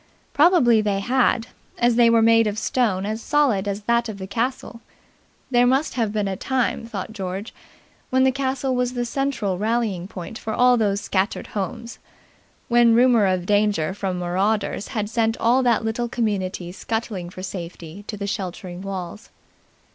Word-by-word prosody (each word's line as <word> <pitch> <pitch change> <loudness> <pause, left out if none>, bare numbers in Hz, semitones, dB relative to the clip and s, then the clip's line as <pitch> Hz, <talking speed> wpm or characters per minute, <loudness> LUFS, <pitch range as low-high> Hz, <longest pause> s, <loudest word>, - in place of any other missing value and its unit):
Probably 280 -8 +5
they 205 -2 0
had, 245 +1 +1 0.3
as 240 -1 +3
they 235 -1 +5
were 230 -1 +4
made 225 0 +5
of 210 0 -2
stone 215 -5 0
as 215 +2 -3
solid 250 -10 +1
as 200 +1 -3
that 235 +1 +1
of 210 - -6
the 190 - -6
castle. 235 +2 -3 0.7
There 245 0 +4
must 270 +5 +1
have 225 -4 0
been 210 -1 -1
a 195 - -2
time, 250 +1 -1
thought 215 -1 -6
George, 195 +1 -5 0.6
when 260 0 +3
the 265 - +4
castle 265 0 -1
was 250 0 0
the 240 0 -1
central 235 -7 -2
rallying 215 -5 -1
point 190 +3 -8
for 220 - -4
all 250 0 +5
those 205 -3 +1
scattered 190 +1 -1
homes; 230 +4 -5 0.7
when 235 -1 +5
rumour 240 -4 +5
of 185 -2 0
danger 205 -5 +1
from 190 -2 -3
marauders 195 +4 -1
had 215 -5 -3
sent 225 +1 0
all 245 +3 +3
that 235 -3 +2
little 235 +2 -2
community 190 -6 -2
scuttling 200 -2 -4
for 185 +1 -9
safety 175 -1 -7
to 210 - -5
the 200 - -4
sheltering 185 -2 -5
walls. 195 +1 -6
220 Hz, 170 wpm, -22 LUFS, 195-240 Hz, 0.7 s, Probably